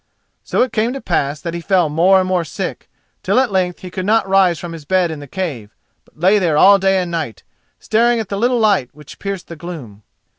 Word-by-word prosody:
So - - +1
it 255 - -4
came 230 +3 0
to 275 - -5
pass 150 - -1
that 170 -1 -5
he 170 - -4
fell 180 -2 +2
more 175 +6 +4
and 185 - -1
more 185 -2 +1
sick, - - -6 0.3
till - - +2
at 260 -4 +1
length 180 -2 -1
he 185 - -8
could 185 - -4
not 220 -1 +2
rise 190 -3 +3
from 170 0 -7
his 165 -2 -9
bed 180 +2 +1
in 155 - -6
the 145 - -10
cave, 135 - -5 0.3
but - - -27
lay 190 +5 +4
there 165 -5 +1
all 200 +3 +7
day 195 0 +2
and 180 -2 -3
night, 155 - -4 0.4
staring 235 +2 +2
at 220 - -4
the 200 - -3
little 245 +2 +2
light 205 - +2
which 150 -2 -14
pierced 195 -2 -5
the 170 - -8
gloom. 150 - -9
185 Hz, 235 wpm, -18 LUFS, 160-200 Hz, 0.4 s, all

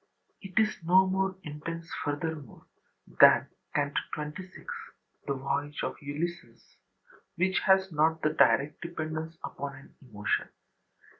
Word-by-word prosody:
It 190 -3 -11
is 215 -1 +2
no 185 +3 +6
more 190 0 0
intense, 165 +3 -6 0.2
furthermore, 145 -2 -4 0.4
than - - +7 0.3
Canto 145 -1 +1 0.2
XXVI, 155 +5 -7 0.6
the 140 - 0
voyage 145 +2 -2
of - - -2
Ulysses, 155 +5 -5 0.6
which 185 +2 +2
has 190 -1 +5
not 160 +1 +3
the 155 - +2
direct 145 -1 +3
dependence 160 -1 -4
upon 140 0 -5
an 135 - -15
emotion. 105 -6 -1
160 Hz, 120 wpm, -29 LUFS, 145-175 Hz, 0.6 s, than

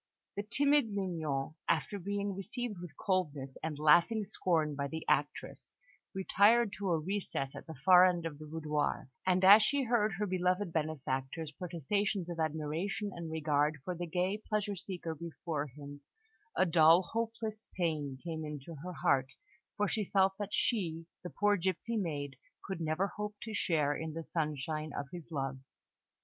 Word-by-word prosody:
The 205 - -1
timid 280 +4 +3
Mignon, 160 -8 -2 0.2
after 170 +5 +1
being 200 +2 -2
received 215 +1 -4
with 170 -5 -9
coldness 150 -9 -1
and 160 -2 -3
laughing 170 +9 +5
scorn 165 -6 +1
by 140 0 -2
the 160 +3 -6
actress, - - -1 0.4
retired 205 +3 +4
to 200 -2 -1
a 170 - +3
recess 165 -6 -2
at - - -9
the 160 - -7
far 185 -1 +9
end 175 -2 0
of 150 -3 -5
the 155 - -9
boudoir; 150 -3 -2 0.2
and 185 0 +3
as 205 +3 +10
she 275 +6 +2
heard 225 -4 +2
her 205 +4 -1
beloved 185 -1 0
benefactor's 150 -1 -2
protestations 180 +2 -2
of 170 - -6
admiration 160 +6 -2
and 170 -1 -6
regard 150 -1 +1
for 180 - -2
the 175 0 -4
gay 185 +5 -1
pleasure 210 -2 0
seeker 175 -3 -5
before 160 -1 -4
him, 145 +1 -10 0.6
a - - +5
dull, 165 +1 +6
hopeless 225 +1 -4
pain 155 -6 -1
came 160 -2 -4
into 150 +1 -6
her 180 0 -5
heart, 135 -1 +3 0.4
for 205 - +2
she 215 +1 -1
felt 190 -1 +4
that 205 -1 -3
she, 170 -8 0 0.2
the 180 - -5
poor 205 +2 +2
gipsy 190 +6 -1
maid, 145 -9 -2 0.3
could 190 -4 -4
never 160 +4 +1
hope 210 0 -3
to 220 - -6
share 150 -7 +1
in 160 0 -4
the 165 +1 -5
sunshine 155 -1 -2
of 145 - -2
his 175 -2 -9
love. 135 -3 -2
170 Hz, 165 wpm, -33 LUFS, 155-200 Hz, 0.6 s, as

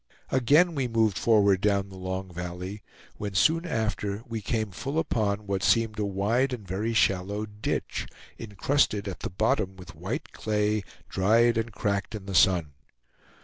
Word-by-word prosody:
Again 145 +8 +4
we 135 -4 -1
moved 110 -4 +2
forward 100 -4 +4
down 100 -1 +1
the 95 - -11
long 95 0 -5
valley, 90 +4 -6 0.4
when 100 -2 -5
soon 165 - +3
after 105 -4 -2
we 115 -2 -4
came 110 0 -1
full 140 - -4
upon 105 -9 0
what 100 -1 -1
seemed 110 0 +2
a 105 - +1
wide 110 +7 +1
and 110 -6 -7
very 100 +5 -1
shallow 100 +1 +1
ditch, 105 0 -3 0.3
incrusted 105 0 0
at 95 - -5
the - - -4
bottom 95 0 0
with 90 -1 -11
white 95 - -5
clay, 105 0 0 0.3
dried 115 +5 +3
and 115 +1 -1
cracked 100 0 -2
in 100 -3 -7
the 100 - -5
sun. 85 -3 +4
105 Hz, 160 wpm, -27 LUFS, 95-115 Hz, 0.4 s, Again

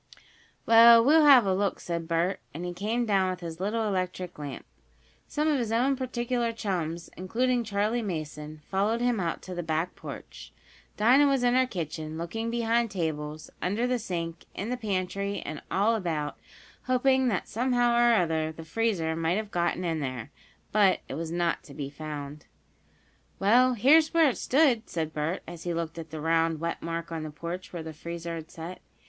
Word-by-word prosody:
"Well, 230 0 +8
we'll 310 +2 +6
have 265 -6 +8
a 190 - +2
look," 195 +1 0
said 170 -1 -4
Bert, 170 +3 0 0.2
as 170 - -5
he 175 0 -4
came 220 +6 -1
down 195 -3 +2
with 185 -1 -4
his 165 -1 -6
little 215 +3 -1
electric 185 -3 -3
lamp. 145 -2 -6 0.6
Some 300 +1 -1
of 295 -3 +2
his 230 -3 -2
own 255 +4 +2
particular 240 -2 -1
chums, 175 -7 -3
including 240 +6 0
Charley 215 +2 0
Mason, 155 -5 -5
followed 205 +4 +1
him 240 -2 +1
out 170 -3 -2
to 185 - -7
the 175 - -3
back 160 +2 -2
porch, - - -10 0.4
Dinah 255 +7 +5
was 270 -3 +2
in 245 0 +3
her 255 0 +3
kitchen, 160 - -5
looking 225 +8 -3
behind 235 0 +1
tables, 155 -5 -4
under 205 +7 0
the 250 0 0
sink, 170 -5 -4
in 200 +4 -4
the 250 - 0
pantry 200 -2 -2
and 155 - -5
all 205 +4 +2
about, 160 -8 -2 0.5
hoping 260 +1 +3
that, 200 -7 -1
somehow 245 +1 +1
or 240 0 +5
other, 160 -4 +1
the 160 0 -10
freezer 165 -4 0
might 165 +3 0
have 215 -1 -4
gotten 175 +1 0
in 165 -2 -1
there. 130 -2 -5 0.4
But 200 -3 +4
it - - -6
was 160 +3 -4
not 170 -1 0
to 140 - -12
be 140 -1 -5
found. 150 -1 -7 0.9
"Well, 245 +5 +4
here's 310 +8 +5
where 325 -3 +6
it - - -8
stood," 260 -5 +2
said 160 -2 -3
Bert, 155 +4 -2
as 170 -1 -8
he 175 -1 -2
looked 165 0 -4
at 165 -1 -8
the 155 +1 -6
round, 165 0 +1
wet 170 +1 -3
mark 165 0 -4
on 165 -1 -3
the 155 - -5
porch 170 +4 -6
where 170 -2 -5
the 160 0 -7
freezer 170 +2 -6
had 160 -1 -7
set. 170 +3 -8
185 Hz, 190 wpm, -28 LUFS, 165-230 Hz, 0.9 s, Well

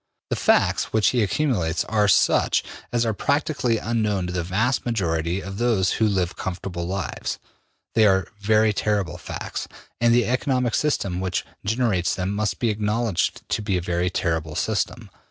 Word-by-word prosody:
The - - +2
facts - - +3
which 110 -1 +2
he 125 - +1
accumulates 105 - 0
are 105 -1 +2
such 100 - +3 0.3
as 120 -1 +1
are 110 - +1
practically 140 -1 0
unknown 105 -4 0
to 90 - -4
the 90 - 0
vast 110 +9 0
majority 90 -5 -1
of 95 +2 -7
those 110 -7 +2
who 110 - +2
live 95 -4 0
comfortable 90 -2 -4
lives. 95 0 -3 0.6
They 110 -1 +5
are 95 -1 +2
very 110 +1 +3
terrible 100 -5 -1
facts, - - -5 0.3
and 120 0 +4
the 120 0 +4
economic 125 -1 0
system 100 -12 0
which 95 -2 -2 0.2
generates 105 -5 +1
them 95 +1 -2
must 105 0 -1
be 115 -3 +1
acknowledged 105 -1 -1
to - - 0
be 100 -3 0
a - - -2
very 90 0 0
terrible 80 -4 -2
system. - - -2
105 Hz, 165 wpm, -23 LUFS, 90-115 Hz, 0.6 s, They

